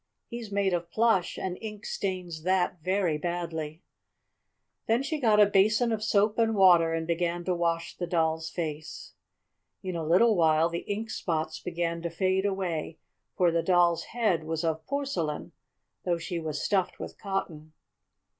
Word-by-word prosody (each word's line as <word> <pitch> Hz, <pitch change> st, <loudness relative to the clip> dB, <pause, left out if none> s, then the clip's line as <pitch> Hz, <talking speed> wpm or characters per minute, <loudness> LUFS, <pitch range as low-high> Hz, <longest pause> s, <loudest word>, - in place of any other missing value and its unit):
He's 235 Hz, -3 st, -7 dB
made 200 Hz, -2 st, +1 dB
of 170 Hz, -1 st, -2 dB
plush, 220 Hz, -4 st, +2 dB
and 185 Hz, -1 st, -4 dB
ink 215 Hz, -1 st, -7 dB
stains 180 Hz, -4 st, -3 dB
that 180 Hz, 0 st, +1 dB
very 185 Hz, -3 st, 0 dB
badly." 165 Hz, -1 st, -4 dB, 1.0 s
Then 230 Hz, +4 st, +2 dB
she 300 Hz, +2 st, -2 dB
got 220 Hz, -5 st, +4 dB
a 210 Hz, -, +9 dB
basin 215 Hz, +4 st, +3 dB
of 215 Hz, -1 st, -1 dB
soap 210 Hz, +1 st, +2 dB
and 225 Hz, -1 st, +2 dB
water 175 Hz, -4 st, +6 dB
and 165 Hz, 0 st, -1 dB
began 170 Hz, +1 st, -1 dB
to 185 Hz, -, +1 dB
wash 170 Hz, -1 st, -1 dB
the 175 Hz, -, -4 dB
Doll's 160 Hz, -1 st, 0 dB
face. 155 Hz, -1 st, -6 dB, 0.7 s
In 185 Hz, -2 st, -4 dB
a 165 Hz, -, -2 dB
little 185 Hz, +8 st, +4 dB
while 160 Hz, -1 st, +3 dB
the 170 Hz, 0 st, -6 dB
ink 220 Hz, +2 st, -3 dB
spots 160 Hz, -5 st, -2 dB
began 170 Hz, -1 st, -3 dB
to 170 Hz, -, -3 dB
fade 190 Hz, +3 st, +1 dB
away, 175 Hz, -5 st, -3 dB, 0.4 s
for 175 Hz, -2 st, +4 dB
the 165 Hz, 0 st, +1 dB
Doll's 175 Hz, -2 st, +3 dB
head 215 Hz, -9 st, 0 dB
was 160 Hz, +1 st, -3 dB
of 160 Hz, -1 st, -1 dB
porcelain, 265 Hz, -, -2 dB, 0.5 s
though 175 Hz, -2 st, +1 dB
she 170 Hz, +1 st, -4 dB
was 155 Hz, -3 st, -4 dB
stuffed 195 Hz, -3 st, 0 dB
with -, -, -8 dB
cotton. 165 Hz, -6 st, -4 dB
175 Hz, 165 wpm, -28 LUFS, 165-200 Hz, 1.0 s, a